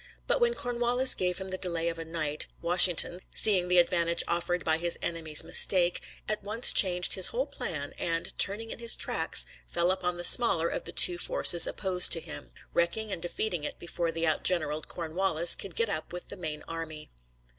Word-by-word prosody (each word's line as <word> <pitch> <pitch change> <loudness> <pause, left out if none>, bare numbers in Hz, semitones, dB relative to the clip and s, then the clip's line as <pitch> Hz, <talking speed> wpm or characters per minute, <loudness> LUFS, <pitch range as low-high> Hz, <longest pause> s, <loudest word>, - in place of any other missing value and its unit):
But - - -2
when 475 0 0
Cornwallis 245 - 0
gave 180 -1 -3
him 190 0 -8
the 185 0 -5
delay 170 -2 -4
of 165 0 -5
a 165 - -8
night, 155 -2 -2
Washington, 175 0 +3
seeing 190 -5 +2
the 180 0 +1
advantage 170 -1 +1
offered 175 +1 -3
by 160 0 0
his 170 0 -1
enemy's 160 -3 0
mistake, 180 -2 +2 0.3
at 215 0 -3
once 215 +4 +4
changed 180 -2 +3
his 185 - +5
whole 260 +3 -4
plan, 150 - -7
and, 165 0 -4
turning 215 +3 +1
in - - -10
his 235 0 -1
tracks, - - 0 0.2
fell 175 +1 -1
upon 180 -2 -4
the 175 - -7
smaller 170 -7 +6
of - - -7
the - - -7
two 175 -1 +2
forces 170 -1 +5
opposed 185 -2 +3
to 165 - +2
him, - - -11 0.2
wrecking 205 +6 -2
and 175 - -6
defeating 175 -1 -5
it - - -6
before 170 -1 -5
the 165 0 -4
outgeneraled 155 -1 -2
Cornwallis 170 0 0
could 190 -4 -3
get 230 - -1
up 175 -7 -6
with 180 0 -10
the - - -7
main 155 -5 -8
army. 160 -2 -9
175 Hz, 190 wpm, -26 LUFS, 165-195 Hz, 0.3 s, smaller